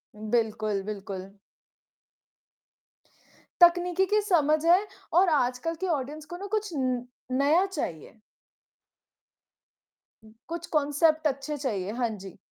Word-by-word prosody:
बिल्कुल, 215 -2 -1
बिल्कुल। 195 -1 -7 2.2
तकनीकी 355 +1 +5
की 420 +2 +2
समझ 310 -6 +2
है 350 +3 +6 0.4
और 380 - +4
आजकल 270 +2 0
की 375 - +1
ऑडियंस 295 +4 -7
को 350 - -5
ना 400 - -7
कुछ 430 -1 -1
न 255 -3 -1 0.3
नया 290 +8 +3
चाहिए। 225 - -5 2.3
कुछ 340 0 -4
कॉन्सेप्ट 305 +1 +3
अच्छे 285 +1 -3
चाहिए। 205 -8 -3
हाँ 235 -2 +1
जी। 190 -1 -11
285 Hz, 105 wpm, -27 LUFS, 220-340 Hz, 2.3 s, है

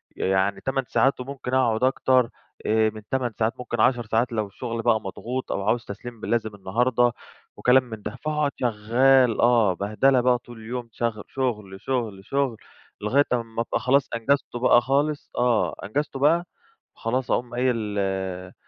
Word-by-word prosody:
يعني 95 +1 0
8 135 0 0
ساعات 135 0 +2
وممكن 130 0 -6
اقعد 120 -3 +2
أكتر 130 -2 +3 0.4
آآ 110 0 +3
من 110 0 -10
8 130 -3 0
ساعات 110 +1 +1
ممكن 120 -2 -2
10 120 -1 +3
ساعات 115 +3 +1
لو 110 -2 -1
الشغل 115 +3 -5
بقى 115 -2 +2
مضغوط 120 +6 -5
أو 100 - -2
عاوز 115 +1 +1
تسليم 115 +3 -8
ب - - -5
لازم 110 -3 -1
النهارده 120 +5 +1 0.5
وكلام 125 +1 +4
من 110 -4 -9
ده، 105 - -6
فاقعد 150 -2 0
شغّال 120 +2 +3
آه، 115 -5 +4
بهدلة 110 +8 +2
بقى 125 0 +3
طول 120 -1 -13
اليوم 120 +1 -5
شغ 115 -2 -2
شغل، 105 -8 -3
شغل، 110 -7 -3
شغل، 135 -2 0 0.4
لغاية 130 +7 +3
أمّا 115 -1 -2
أبقى 115 - -1
خلاص 135 +2 +2
أنجزته 120 0 0
بقى 120 -1 +5
خالص، 145 +3 0
آه 120 -3 +2
أنجزته 140 +5 -3
بقى، 165 +5 +3 0.5
خلاص 125 +3 -2
أقوم 120 -1 0
قايل 115 -5 0
آآ، 95 -2 -3
120 Hz, 165 wpm, -24 LUFS, 110-130 Hz, 0.5 s, بقى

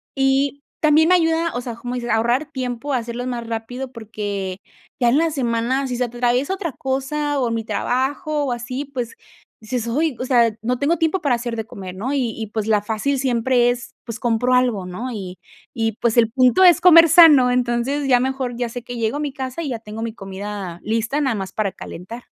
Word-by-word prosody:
Y 270 +1 +1 0.2
también 315 +2 +4
ayuda 330 -1 +3
o 245 - -2
sea, 240 -2 -6
como 245 +2 -5
dices, 240 -1 -4
a 225 - +3
ahorrar 240 +6 +1
tiempo, 255 0 -3
a - - +2
hacerlos 240 +1 -4
más 235 -2 -4
rápido, 245 +3 -5
porque, 205 -5 -5 0.4
ya 240 -1 +4
en 270 - +3
la 330 +1 +2
semana, 255 0 0
si 250 - -3
se 250 - +1
atraviesa 245 +7 0
otra 360 -6 -3
cosa 275 +3 -2
o 245 -3 +1
mi 230 0 -2
trabajo, 280 +6 -1
o 260 - -2
así, 250 +4 -4
pues, 250 -4 -5 0.5
dices: 235 +1 -3
"Ay, 295 +4 0
o 255 - -2
sea, 240 -3 +4
no 250 +2 -1
tengo 300 +6 +1
tiempo 325 +3 0
para 275 -5 +2
hacer 235 0 -4
de 225 - -4
comer", 185 -3 -9
¿no? 245 +9 -3
Y 250 -6 0
y, 220 -1 -4
pues, 215 0 -3
la 210 -2 +3
fácil 225 +6 -1
siempre 245 -1 +2
es, 245 -1 -7
pues, 230 -2 -6
compro 245 +2 +1
algo, 245 -7 +2
¿no? 225 +8 -5
Y 190 -4 -6 0.4
y, 225 -3 -1
pues, 235 0 +1
el 230 -1 +5
punto 255 +8 +4
es 350 -2 +6
comer 335 -2 +8
sano. 300 -7 +8
Entonces, 250 +3 0
ya 250 -2 +5
mejor 260 -1 -2
ya 245 -1 -1
sé 245 +1 -7
que 245 0 -7
llego 230 +5 -1
a - - -4
mi 290 -2 -2
casa 260 +4 -5
y 290 - -3
ya 235 -3 -3
tengo 215 0 -8
mi 230 - -4
comida 195 -3 -6
lista, 225 +6 -1
nada 260 -5 +1
más 190 -1 -5
para 205 -3 -1
calentar. 225 +8 -9
245 Hz, 215 wpm, -21 LUFS, 225-275 Hz, 0.5 s, comer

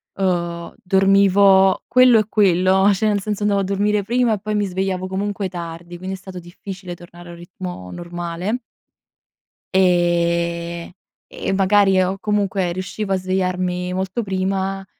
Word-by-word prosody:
uhm, 170 -3 -2
dormivo 195 0 +4
quello 255 -2 +6
e 215 - 0
quello, 190 -1 +3
cioè 215 +3 0
nel 205 -1 +1
senso 210 0 -3
andavo 200 -1 +2
a - - -1
dormire 205 +2 0
prima 240 +2 +1
e 210 - -2
poi 215 +1 -3
mi 205 - +1
svegliavo 185 0 -2
comunque 200 +1 -3
tardi, 170 0 -8
quindi 185 +2 -5
è - - -9
stato 185 -1 -9
difficile 180 +1 -9
tornare 175 0 -14
a - - -8
un 170 - -11
ritmo 175 - -8
normale. 175 +5 -4 1.1
Ehm, 170 -2 +1 0.4
e - - -4
magari 195 0 +4
o 185 +1 -1
comunque 200 -3 0
riuscivo 185 +3 -4
a 190 - +2
svegliarmi 185 -1 -2
molto 190 +5 -2
prima 195 0 -2
190 Hz, 150 wpm, -20 LUFS, 175-200 Hz, 1.1 s, quello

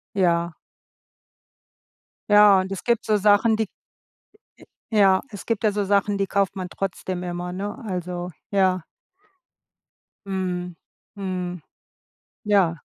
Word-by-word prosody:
Ja. 170 -3 +2 1.8
Ja, 205 -2 +7
und 190 +1 -6
es 195 - -5
gibt 235 -2 +1
so 215 - +3
Sachen, 210 +2 +4
die 220 -1 0 1.2
Ja. 195 -3 +5
Es 205 -4 -9
gibt 230 -2 -1
da 215 - +4
so 205 -1 -1
Sachen, 200 +1 +2
die 195 0 0
kauft 200 -1 0
man 185 -2 -5
trotzdem 185 -1 -4
immer, 175 0 -4
ne? 200 +3 -4
Also, 180 -1 -4 0.2
ja. 185 -3 +2 1.4
Mhm, 180 -2 -3 0.4
mhm. 180 -3 -4 0.8
Ja. 195 -6 +3
190 Hz, 115 wpm, -23 LUFS, 180-205 Hz, 1.8 s, Ja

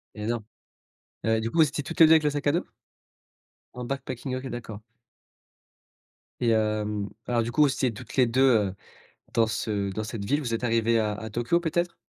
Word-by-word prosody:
Et 105 - -5
non. 115 -1 -1 0.8
Heu, 110 0 +2
du 115 - -2
coup, 170 - -3
vous 155 -3 +6
étiez 145 -1 -4
toutes 165 +3 -7
les 160 - +11
2 160 - +5
avec 160 - +6
le 150 - +3
sac 145 0 -4
à 145 - +4
dos? 170 - -1 1.1
En 125 0 -6
backpacking. 135 -1 -4
OK, 130 +1 -5
d'accord. 115 -3 -7 1.6
Et 120 - +2
hem, 105 -2 0 0.2
alors 120 -1 +1
du 115 +1 -3
coup, 150 - +4
vous 145 - +6
étiez 130 -4 0
toutes 105 - -10
les 125 -3 +4
2, 125 +3 +1 0.3
heu, 95 - -6 0.6
dans 115 -2 +3
ce 105 -3 -2
dans 110 +2 -3
cette 110 -2 -5
ville, 145 +8 +1
vous 120 -5 -3
êtes 115 +2 -1
arrivées 115 0 +2
à 105 -1 0
à 110 +1 -7
Tokyo 120 +10 +1
peut-être? 175 +1 -1
120 Hz, 210 wpm, -26 LUFS, 110-145 Hz, 1.6 s, les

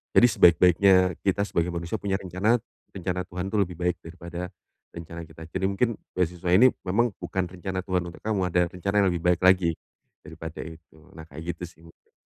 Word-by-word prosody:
Jadi, 120 - +8
sebaik-baiknya 90 +3 +6 0.3
kita 100 +1 +1
sebagai 85 +1 0
manusia 85 +5 -3
punya 100 -1 -2
rencana, 95 +6 +1 0.4
rencana 90 -1 -3
Tuhan 90 0 -5
itu 105 - 0
lebih 90 - -9
baik 90 -1 0
daripada 85 +1 -7 0.5
rencana 85 0 -8
kita. 80 0 -12
Jadi, 95 +1 -2
mungkin 115 +5 +1 0.3
beasiswa 90 0 -1
ini 125 +8 +7 0.2
memang 120 +6 +2
bukan 95 -1 -2
rencana 95 0 -4
Tuhan 90 -2 0
untuk 85 - -11
kamu, 105 -3 0
ada 90 +1 +3
rencana 95 +3 -4
yang 95 - +3
lebih 85 -1 -4
baik 85 - -6
lagi 90 -3 +5 0.5
daripada 80 -1 -8
itu. 80 0 -13 0.2
Nah, 80 - -9
kayak 80 +3 -6
gitu - - -9
sih 80 - -22
mungkin. 80 - -21
90 Hz, 185 wpm, -26 LUFS, 85-95 Hz, 0.5 s, Jadi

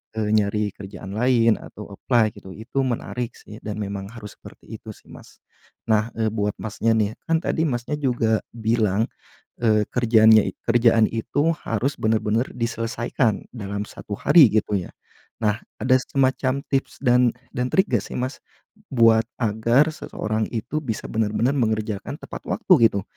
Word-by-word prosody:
eee, 110 -1 -1
nyari 105 0 +1
kerjaan 95 0 -9
lain, 115 -2 +3
atau 105 -1 -11
apply 110 +1 +1
gitu, 95 - -10
itu 115 +5 -4
menarik 125 -1 -3
sih 110 +1 -12
dan 105 -1 -3
memang 100 -1 -4
harus 110 -3 -10
seperti - - -14
itu - - -12
sih - - -22
Mas. - - -15 0.5
Nah, 110 0 +3
eee, 110 -1 0
buat 105 -2 -1
Masnya 110 +1 0
nih, 105 -2 +1 0.2
kan 165 -1 +2
tadi 160 0 0
Masnya 120 +2 -2
juga 120 -5 +1 0.2
bilang, 110 -2 +1 0.5
eee, 110 -2 +3
kerjaannya 110 -3 +5
i - - -7
kerjaan 115 -1 +4
itu 145 +8 0 0.2
harus 120 +6 -1
benar-benar 110 +2 +1
diselesaikan 115 0 -1
dalam 100 -2 -4
1 100 - -7
hari 155 - +6
gitu 105 -1 +1
ya. 90 - -8 0.5
Nah, 105 -1 +1 0.2
ada 130 0 +4
semacam 130 0 0
tips 135 -1 -1
dan 125 -2 +4 0.2
dan 125 0 0
trik 190 - +4
gak 120 -5 +2
sih - - -8
Mas? 130 +2 -3 0.5
Buat 115 -3 +5 0.2
agar 115 +6 +3
seseorang 110 -7 -3
itu 120 +7 -2
bisa 115 -6 -4
benar-benar 110 +4 +1
mengerjakan 110 -1 -1
tepat - - -8
waktu 170 - +4
gitu? 100 -2 -3
115 Hz, 155 wpm, -23 LUFS, 105-125 Hz, 0.5 s, hari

